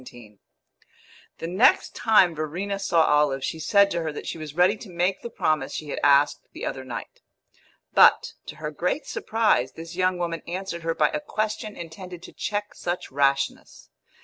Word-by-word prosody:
XVII 110 -5 -14 1.0
The - - -6
next 190 +10 +3
time 200 -6 +4
Verena 175 +6 -3
saw 170 -4 +3
Olive 150 -3 +2
she 160 - -3
said 200 +4 +4
to 170 - -1
her 160 -1 -2
that 150 - -8
she 165 - -5
was 155 -1 -8
ready 180 +4 +4
to 205 - -11
make 180 +2 -1
the 235 - -6
promise 155 -10 -1
she 150 - -5
had - - -3
asked 145 0 +3
the - - -6
other 130 - -4
night; 125 -2 -8 0.7
but, - - +5
to - - -7
her 150 -1 -5
great 180 - -2
surprise, 215 - +1
this 165 +1 -9
young 185 0 +1
woman 170 -2 -3
answered 175 -1 -4
her 165 0 -2
by - - +3
a 300 - -2
question 215 -6 -3
intended 175 +1 -9
to - - -11
check 205 0 -3
such 175 +1 -4
rashness. 140 0 -1
170 Hz, 180 wpm, -25 LUFS, 150-195 Hz, 1.0 s, but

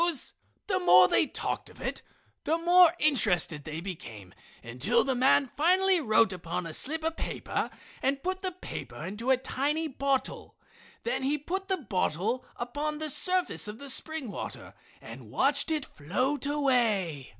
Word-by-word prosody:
So 345 0 +4 0.5
the 375 -2 0
more 180 - +7
they 310 - +3
talked - - -3
of - - -17
it, - - -4 0.4
the 320 +2 +1
more 350 0 +6
interested 200 - +2
they 155 +1 -5
became 115 - -8 0.3
until 195 - +1
the 270 - 0
man 260 +1 +3
finally 370 +3 +4
wrote 220 -5 +3
upon 175 0 -4
a 165 - -6
slip 315 - 0
of 325 0 -1
paper - - -3 0.3
and 275 +1 0
put 375 +1 -2
the 375 -2 -1
paper 365 - -8
into 210 +6 -4
a 265 - +5
tiny 285 +5 -1
bottle. 275 -1 -2 0.5
Then 475 - -1
he 280 +3 +1
put 380 +7 -4
the 380 - +1
bottle 215 - -1
upon 290 +5 -3
the 310 -1 -2
surface 365 - +1
of 210 +1 -6
the 280 +2 -4
spring 310 -3 -2
water - - -7 0.3
and 115 0 -11
watched 280 - +2
it 310 -3 -1
float 255 - -2
away. 230 - +1
270 Hz, 160 wpm, -29 LUFS, 195-315 Hz, 0.5 s, more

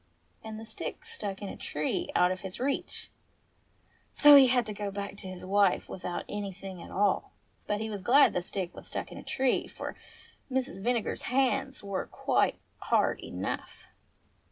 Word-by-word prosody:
And 220 -1 -6
the 225 - -8
stick 220 - -6
stuck 200 -1 -5
in 200 - -4
a - - -6
tree 150 +1 -2
out 180 +1 +5
of 185 - -3
his 190 -1 -6
reach; 275 +2 -2 1.0
so 295 -1 +9
he 275 -2 +9
had 245 -1 +3
to 215 - -4
go 205 0 -3
back 200 0 -5
to 190 - -9
his 185 -1 -7
wife 200 0 +3
without 180 -1 -4
any 205 -1 -4
thing 190 -1 -9
at - - -10
all. 200 0 +1 0.3
But 210 0 0
he 220 - -2
was 205 -2 -4
glad 260 +9 +6
the 180 - 0
stick 180 0 -4
had - - -10
stuck - - -5
in - - -8
a - - -10
tree, 260 -1 +1
for - - -6 0.6
Mrs. 255 -7 -1
Vinegar's 240 -1 0
hands 270 0 +1
were 200 -1 -3
quite - - +1 0.2
hard - - +2
enough. - - -5
205 Hz, 180 wpm, -30 LUFS, 190-245 Hz, 1.0 s, so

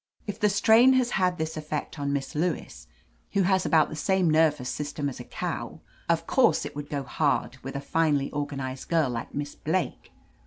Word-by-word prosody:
"If 205 0 -5
the 210 -2 +3
strain 225 +5 +6
has 255 -2 +2
had 180 -2 +1
this 160 0 -3
effect 150 0 -4
on 140 0 -1
Miss 140 -1 -2
Lewis, 160 0 -3 0.5
who 200 - +3
has 190 0 +2
about 160 -3 +4
the - - -6
same 180 +2 +2
nervous 155 -5 +2
sys 145 -1 -3
tem 145 -2 -1
as 135 - -5
a - - -6
cow, - - -5 0.3
of - - +2
course - - +3
it - - -7
would 145 0 -6
go 140 -2 -2
hard 135 0 0
with 135 +2 -7
a 140 - -3
finely 145 -2 +1
organized 135 -3 -4
girl 160 -6 +2
like 115 -1 -5
Miss 145 0 -3
Blake. 175 +4 -3
155 Hz, 200 wpm, -27 LUFS, 140-180 Hz, 0.5 s, strain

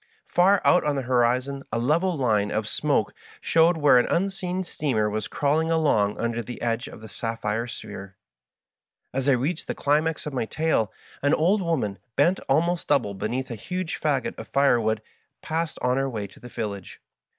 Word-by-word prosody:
Far 185 +2 +3
out 180 - +5
on 150 -1 0
the 135 - -2
horizon 125 +2 +1
a 110 - 0
level 160 +9 +1
line 105 -6 +1
of 110 -1 -2
smoke 140 -4 0 0.3
showed 165 +1 +3
where 145 -5 +6
an - - +1
unseen 185 0 -1
steamer 135 -11 0
was 110 0 -2
crawling 155 +3 +1
along 145 -11 +2
under 115 0 -1
the 120 +2 -8
edge 115 0 -1
of - - -11
the 110 - -9
sapphire 115 +2 -3
sphere. 100 -4 -8 1.0
As 135 +2 0
I - - +6
reached 140 +7 -1
the - - -3
climax 155 +2 +1
of 150 - -5
my 125 - -1
tale 155 -5 0 0.3
an 145 +2 +3
old 190 +6 +2
woman, 135 - -1 0.2
bent 175 +7 +3
almost 170 +5 +1
double 120 -9 +2
beneath 120 +6 -3
a - - -3
huge 180 - -4
fagot 145 -4 0
of - - -8
firewood, 115 -6 +2 0.4
passed 160 0 -2
us - - +2
on 125 +1 +2
her 135 0 0
way 110 -5 -4
to 100 - -14
the 125 - -11
village. 100 -5 -5
135 Hz, 185 wpm, -25 LUFS, 115-160 Hz, 1.0 s, where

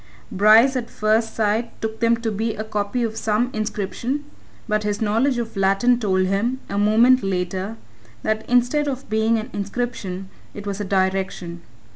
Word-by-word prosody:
Bryce 220 +6 +6
at 240 -2 -3
first 220 +1 0
sight 220 +2 -1
took 220 0 -4
them 230 0 +3
to 225 -1 -1
be 220 +2 -2
a 215 - -4
copy 215 +3 -2
of 225 -1 -3
some 225 +3 0
inscription 215 +6 -3 0.4
but 215 -1 +1
his 210 0 -2
knowledge 230 +5 +1
of 230 -2 -4
Latin 195 +5 +3
told 190 -4 +1
him, 215 +7 0
a 200 - 0
moment 230 +5 +5
later, 190 +3 -2 0.5
that 215 0 0
instead 250 +5 +2
of 270 -1 -4
being 220 +1 +2
an 220 +3 -5
inscription, 200 -3 -4 0.3
it 205 - -8
was 200 0 -3
a - - -3
direction. 190 -2 -1
215 Hz, 165 wpm, -22 LUFS, 200-235 Hz, 0.5 s, Bryce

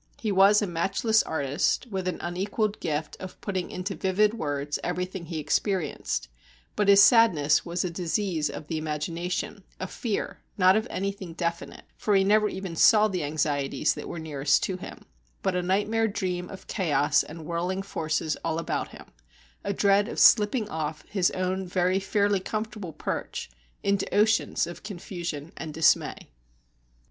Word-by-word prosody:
He 215 - -1
was 200 +2 +5
a - - +1
matchless 195 +5 +1
artist, 145 - 0
with 190 -2 -2
an 180 - -1
unequalled 200 +4 -2
gift 155 -2 -3
of 185 0 -9
putting 190 -3 -3
into 185 +2 -4
vivid 200 +3 +2
words 145 -7 -3
everything 180 0 -3
he 165 -1 -4
experienced; 155 - -1 0.5
but 205 - +1
his 200 0 +8
sadness 170 - +5
was 170 +1 -1
a 180 - -2
disease 175 -2 -1
of - - -7
the 160 0 -3
imagination, 165 +5 -3 0.2
a - - -3
fear, 210 +3 -3 0.2
not 185 -1 +6
of 220 +2 0
anything 195 -3 -4
definite 170 -1 -4
for 210 - +1
he 195 - +5
never 210 +2 +4
even 190 -3 -6
saw 215 +5 +6
the 185 -5 -2
anxieties 145 -1 0
that - - -7
were - - -6
nearest 150 -2 +1
to 185 - -2
him 185 - -10 0.4
but 190 - +1
a 180 - +1
nightmare 205 +5 +1
dream 180 -3 -3
of 190 - -10
chaos 155 -5 +2
and 160 0 -9
whirling 180 +4 -2
forces 160 -4 -2
all 165 -1 -1
about 165 - -2
him, - - -13 0.6
a 200 - -1
dread 200 +1 +3
of - - -4
slipping 215 +1 +5
off 155 -3 -4
his 190 -4 +2
own 185 0 -1
very 180 +1 +1
fairly 200 0 +1
comfortable 215 -2 -4
perch 155 - -4 0.3
into 200 -1 0
oceans 215 -1 +2
of 170 +1 -9
confusion 175 -6 -6
and 155 -2 -6
dismay. 160 0 +2
185 Hz, 160 wpm, -27 LUFS, 160-200 Hz, 0.6 s, his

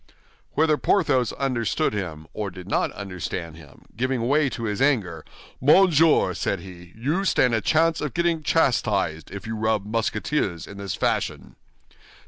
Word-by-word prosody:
Whether 155 0 +3
Porthos 140 - +2
understood 120 -9 -1
him 85 -7 -5
or 105 -2 -3
did 90 0 -11
not - - 0
understand 90 -4 -5
him, 75 -5 -16
giving 125 0 -1
way 145 +1 +3
to 115 - -6
his 105 +1 -2
anger, 100 - +1 0.4
"Monsieur," 160 +2 +5
said - - -2
he, 90 -2 -12
"you 145 - -1
stand 125 -10 +2
a 110 - +1
chance 160 +6 +2
of 150 -4 -4
getting 170 -1 +1
chastised 105 - +1
if 100 0 -8
you 110 0 -4
rub 110 -2 0
Musketeers 110 - -1
in 100 - -11
this 100 -2 -4
fashion." - - -2
110 Hz, 150 wpm, -24 LUFS, 95-145 Hz, 0.4 s, Monsieur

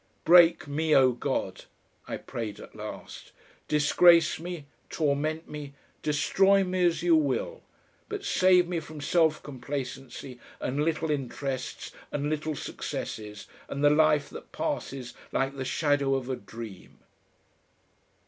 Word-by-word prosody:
"Break 170 -2 +6
me, 155 +2 +1
O 130 -1 +6
God," 120 - -3 0.4
I - - -3
prayed 110 -3 -6
at - - -12
last, - - -9 0.3
"disgrace 160 +3 +5
me, 170 -3 -6 0.2
torment 155 +1 -1
me, 145 -2 -8 0.3
destroy 195 +6 +3
me 185 0 -1
as 170 0 -1
you 175 -2 +5
will, 145 -4 0 0.5
but 415 -1 -5
save 185 -1 +4
me 175 -1 -1
from 155 -1 -10
self 160 +1 +2
complacency 130 -1 -6 0.2
and 140 +4 -1
little 160 0 0
interests 135 -2 -4 0.2
and 145 +1 -2
little 155 0 -2
successes 105 -5 -6 0.2
and 140 +1 -3
the 145 - +6
life 150 -1 +4
that - - -10
passes 130 -3 -4 0.2
like 135 +1 0
the 135 - -4
shadow 140 0 +1
of 130 -1 -3
a - - 0
dream." 110 -2 -10
150 Hz, 130 wpm, -28 LUFS, 135-160 Hz, 0.5 s, Break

